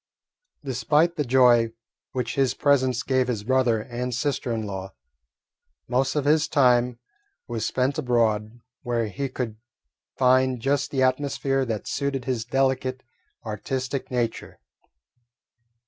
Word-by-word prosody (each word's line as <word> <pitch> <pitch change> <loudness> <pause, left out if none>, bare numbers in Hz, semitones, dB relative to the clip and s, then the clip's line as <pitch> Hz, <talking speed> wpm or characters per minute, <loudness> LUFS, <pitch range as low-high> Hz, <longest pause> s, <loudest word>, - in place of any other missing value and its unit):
Despite 150 +7 +2
the 150 - 0
joy 120 -3 +4 0.4
which 125 -3 -2
his 135 -2 +1
presence 130 -4 +2
gave 130 -1 +1
his 115 -5 -2
brother 125 -2 +2
and 125 0 -4
sister 130 -2 -1
in 110 -2 -2
law, 95 -1 -6 0.9
most 130 +3 0
of 145 -2 0
his 150 +1 +3
time 125 -3 +3 0.5
was 115 -2 -2
spent 130 +4 0
abroad, 115 -3 0 0.2
where 120 -3 -1
he 135 +6 -3
could 115 -5 -4 0.6
find 130 0 +3
just 140 +3 0
the 135 -2 +1
atmosphere 135 0 0
that 110 -4 -4
suited 135 -2 -2
his 120 -3 -2
delicate, 130 0 0 0.4
artistic 130 +5 -3
nature. 120 -3 -3
130 Hz, 125 wpm, -25 LUFS, 120-135 Hz, 0.9 s, joy